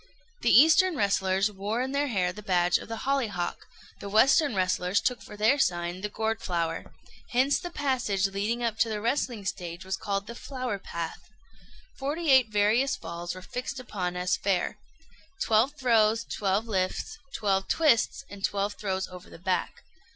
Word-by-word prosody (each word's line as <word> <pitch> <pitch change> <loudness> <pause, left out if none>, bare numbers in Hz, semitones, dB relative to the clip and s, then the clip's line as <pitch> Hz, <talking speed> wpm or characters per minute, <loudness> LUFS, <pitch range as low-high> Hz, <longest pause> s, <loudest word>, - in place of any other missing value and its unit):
The - - +2
eastern 320 +6 +6
wrestlers 195 -2 +1
wore 205 +5 -2
in 265 - -3
their 285 +1 +1
hair 185 -7 0
the 210 - -9
badge 175 -3 +2
of - - -10
the 225 0 -5
hollyhock; 230 -11 -1 0.3
the 200 - -6
western 260 +5 +4
wrestlers 185 +1 +1
took 245 -1 -1
for 210 - -11
their 225 +7 +3
sign 175 -4 0
the 210 - -3
gourd 220 +1 -2
flower. 170 -2 -2 0.4
Hence 265 +2 +2
the 350 - -6
passage 245 - 0
leading 205 +5 -1
up 230 -2 -1
to 230 - +3
the 215 -1 -2
wrestling 235 -2 -1
stage 175 -2 -5
was 190 0 -1
called 200 0 -2
the 235 - -7
"Flower 255 -4 -4
Path." 170 0 -6 0.7
Forty 295 +3 0
eight 260 -4 +6
various 215 +6 +2
falls 170 +2 -6
were 185 - -9
fixed 255 +3 -5
upon 185 -7 -4
as 180 0 +1
fair 195 -3 -1 0.6
twelve 230 - +3
throws, 230 -4 +3
twelve 205 0 -1
lifts, 195 - -2 0.2
twelve 195 -2 0
twists, 275 -3 +2
and 200 -4 -11
twelve 200 +1 0
throws 190 -2 -3
over 180 -1 -12
the - - -12
back. 180 +2 -2
210 Hz, 170 wpm, -28 LUFS, 190-250 Hz, 0.7 s, eastern